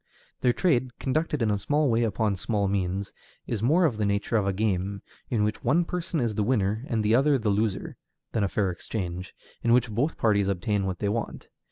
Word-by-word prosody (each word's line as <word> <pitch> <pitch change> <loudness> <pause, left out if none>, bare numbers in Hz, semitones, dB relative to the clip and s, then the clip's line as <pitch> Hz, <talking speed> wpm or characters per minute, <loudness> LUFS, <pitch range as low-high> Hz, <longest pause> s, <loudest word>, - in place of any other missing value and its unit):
Their 125 - +3
trade, 125 -2 +1
conducted 150 -1 0
in 110 - +2
a 100 - 0
small 145 +8 +1
way 115 -2 +2
upon 110 -2 +1
small 100 +1 -1
means, 95 0 -2 0.3
is 110 -4 -3
more 160 +10 +4
of 125 -9 +1
the 110 - 0
nature 100 +3 0
of 105 -3 +2
a - - +2
game, 100 -1 -1 0.3
in 110 -4 +1
which 105 +1 -2
one 160 +8 +3
person 170 -2 -2
is 120 -4 0
the 105 - -1
winner 110 -1 +1
and 110 -3 0
the 110 - +3
other 140 +3 +4
the 110 -4 -1
loser, 105 0 -1 0.3
than 110 - 0
a - - +2
fair 100 -2 0
exchange, 90 0 -5 0.3
in 115 - +3
which 120 -2 +3
both 130 +9 0
parties 100 -3 +2
obtain 100 +1 0
what 95 -1 -2
they 105 - -2
want. 115 +2 -4
110 Hz, 215 wpm, -27 LUFS, 100-125 Hz, 0.3 s, more